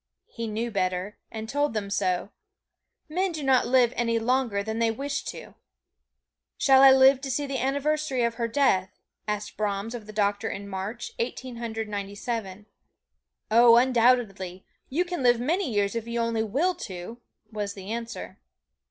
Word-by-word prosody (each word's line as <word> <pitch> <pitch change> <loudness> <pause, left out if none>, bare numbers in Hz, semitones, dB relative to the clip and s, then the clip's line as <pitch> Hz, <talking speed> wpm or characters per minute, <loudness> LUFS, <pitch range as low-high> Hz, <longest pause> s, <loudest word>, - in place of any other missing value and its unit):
He 230 -1 -6
knew 225 +2 -3
better, 185 0 -2
and 220 0 -6
told 290 0 0
them 200 -2 -3
so. 185 0 0 0.8
Men 365 +4 0
do 310 -3 -5
not 265 -2 +3
live 250 -1 +4
any 230 -1 +1
longer 230 -3 0
than 220 +2 -3
they 230 -1 +3
wish 280 +5 -3
to. - - -8 1.0
"Shall 270 -1 +5
I 270 - +10
live 265 0 +6
to 275 - -5
see 285 +3 -1
the 275 -2 -3
anniversary 285 0 0
of 235 0 +1
her 230 0 -2
death?" 230 -7 +2 0.4
asked 210 0 -3
Brahms 210 +1 -2
of 225 -3 -7
the - - -8
doctor 205 +1 0
in 200 0 -6
March, 200 +4 -5
Eighteen 250 +1 -4
Hundred 225 -1 -4
Ninety 200 -1 -5
seven. 205 -3 -4 0.9
"Oh, 230 +1 +7
undoubtedly 230 -7 +2 0.2
you 335 +7 0
can 350 -4 -4
live 240 -2 +4
many 320 +5 0
years 205 -2 +1
if 230 -1 -4
you 235 0 -2
only 230 -1 0
will 285 - +1
to," 190 +5 -8 0.3
was 205 -2 -4
the 195 +1 -8
answer. 230 0 -6
230 Hz, 170 wpm, -26 LUFS, 205-260 Hz, 1.0 s, I